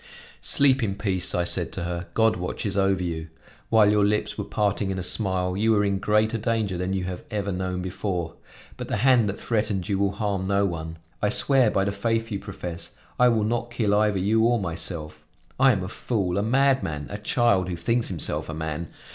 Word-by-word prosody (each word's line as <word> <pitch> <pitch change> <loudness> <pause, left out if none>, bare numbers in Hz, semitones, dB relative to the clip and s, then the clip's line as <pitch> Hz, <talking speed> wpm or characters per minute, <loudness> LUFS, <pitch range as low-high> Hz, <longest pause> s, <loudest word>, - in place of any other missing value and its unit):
"Sleep 135 -2 +4
in 100 -4 -1
peace," 95 -3 0
I 90 - +1
said 85 - 0
to - - -4
her, 85 +1 -4
"God 110 -1 +3
watches 95 +3 -3
over 95 -2 +2
you! 80 -2 -4 0.4
While 110 -2 +5
your 105 -1 +3
lips 105 +1 0
were - - -3
parting 100 -1 -1
in 95 - -2
a 90 - -3
smile, 90 -2 0
you 110 +3 +2
were 105 -1 +2
in 100 -1 0
greater 105 +3 +1
danger 110 -4 -1
than 90 +2 -2
you 95 -1 -1
have 90 -1 -5
ever 105 -3 -2
known 90 -1 -3
before. 90 -2 -3 0.4
But - - -6
the - - -1
hand 125 -5 +5
that 100 - -5
threatened 105 -5 -1
you 100 -1 0
will 100 -1 +1
harm 100 -2 -2
no 100 +1 +1
one; 80 -3 -4 0.2
I 105 - +2
swear 130 +1 +3
by 95 - +1
the 100 - 0
faith 115 +3 -1
you 100 - -2
profess, 90 -4 -7 0.3
I 125 - +6
will 115 -3 +2
not 120 +2 -1
kill 115 -4 0
either 105 -1 +2
you 105 +4 +2
or 120 0 +3
myself! 85 -3 -4 0.4
I 135 0 +6
am 95 -6 -1
a - - -4
fool, 100 -3 -2
a - - +1
madman, 125 - +1
a 105 - -5
child 105 -4 +2
who 90 - -2
thinks 115 +8 0
himself 85 -3 -2
a 80 - -4
man. 80 +1 -4
100 Hz, 215 wpm, -25 LUFS, 90-110 Hz, 0.4 s, I